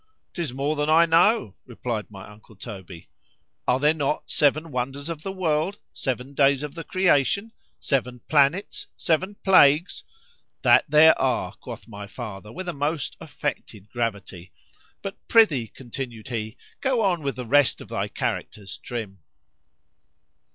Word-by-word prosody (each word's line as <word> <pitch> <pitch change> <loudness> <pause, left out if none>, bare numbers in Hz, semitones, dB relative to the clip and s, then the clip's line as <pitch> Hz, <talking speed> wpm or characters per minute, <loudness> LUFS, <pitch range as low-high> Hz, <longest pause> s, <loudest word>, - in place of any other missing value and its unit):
—'Tis 170 -7 -3
more 140 +4 -1
than 150 0 -1
I 165 +2 +6
know, 170 - +3
replied 120 -3 -4
my 95 -2 -11
uncle 105 +1 -16
Toby.——Are 85 -1 -6
there 150 +2 +4
not 150 -1 -2
seven 155 +2 +2
wonders 135 +4 -3
of 165 -2 -5
the 195 - -4
world?——Seven 155 -6 -2
days 140 0 +3
of 150 - -5
the 165 - -7
creation?——Seven 145 - 0
planets?——Seven 160 +4 +1
plagues?——That 190 - +3
there 155 +2 +6
are, 130 -3 0
quoth - - -10
my 105 -2 -8
father 105 -1 -8
with 185 +5 -7
a 175 - -2
most 145 +1 -2
affected 145 - -5
gravity. 100 -7 -4 0.5
But 195 0 -6
prithee, 155 - +4
continued 120 0 -8
he, 110 -1 -4 0.2
go 260 -3 +1
on 180 -4 +1
with 140 -2 -2
the 125 - -6
rest 145 +2 +3
of - - -11
thy - - -2
characters, 100 -2 -4
_Trim. 110 -5 -5
140 Hz, 130 wpm, -24 LUFS, 115-165 Hz, 0.5 s, I